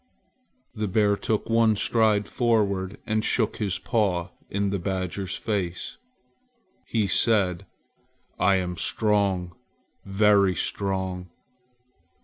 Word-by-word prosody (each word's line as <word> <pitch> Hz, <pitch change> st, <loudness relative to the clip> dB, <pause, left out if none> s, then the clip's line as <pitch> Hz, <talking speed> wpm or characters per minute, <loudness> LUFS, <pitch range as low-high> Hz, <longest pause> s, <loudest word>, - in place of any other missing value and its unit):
The 110 Hz, -3 st, -2 dB
bear 100 Hz, +1 st, +2 dB
took 110 Hz, +1 st, -2 dB
one 115 Hz, -1 st, +3 dB
stride 105 Hz, -1 st, +2 dB
forward 100 Hz, -5 st, 0 dB
and 110 Hz, 0 st, 0 dB
shook 110 Hz, -1 st, +1 dB
his 100 Hz, -4 st, -1 dB
paw 95 Hz, -4 st, 0 dB, 0.2 s
in 100 Hz, 0 st, -1 dB
the 100 Hz, -, -1 dB
badger's 95 Hz, 0 st, -3 dB
face. 95 Hz, -5 st, -3 dB, 0.9 s
He 110 Hz, -3 st, +1 dB
said: 95 Hz, -3 st, +1 dB, 0.7 s
"I 95 Hz, +1 st, +4 dB
am 90 Hz, -2 st, -2 dB
strong, 100 Hz, -6 st, 0 dB, 0.5 s
very 100 Hz, -1 st, +3 dB
strong!" 95 Hz, -1 st, -2 dB
100 Hz, 105 wpm, -25 LUFS, 95-110 Hz, 0.9 s, I